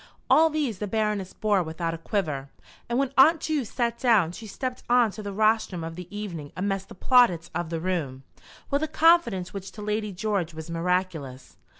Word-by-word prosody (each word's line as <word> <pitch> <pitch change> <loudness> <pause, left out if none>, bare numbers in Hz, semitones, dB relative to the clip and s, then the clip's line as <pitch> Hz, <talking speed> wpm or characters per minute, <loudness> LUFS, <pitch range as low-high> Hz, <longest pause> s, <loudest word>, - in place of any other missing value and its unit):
All 320 +1 +6
these 290 -10 -2
the 210 - -3
Baroness 210 -2 -1
bore 210 -3 +1
without 165 0 -3
a - - -4
quiver, 155 -7 -2 0.4
and 240 - 0
when 275 0 0
Aunt 315 +5 +7
Ju 310 -3 -1
sat 235 +1 -2
down 220 -10 +3
she 220 +5 -9
stepped 255 +5 -4
on 240 -3 +4
to 215 - -8
the 205 -1 -5
rostrum 215 -4 +1
of 165 0 -6
the 180 0 -8
evening 185 -8 -6
amidst 195 0 -2
the - - -11
plaudits 185 -7 +3
of 175 0 -3
the 165 -1 -3
room, 160 -7 -3 0.5
with 280 +1 +2
a 315 - 0
confidence 310 - +3
which 195 -1 -7
to 210 - -8
Lady 210 0 -2
George 185 -4 -2
was 160 +1 -7
miraculous. 165 -6 -2
200 Hz, 195 wpm, -26 LUFS, 170-235 Hz, 0.5 s, Aunt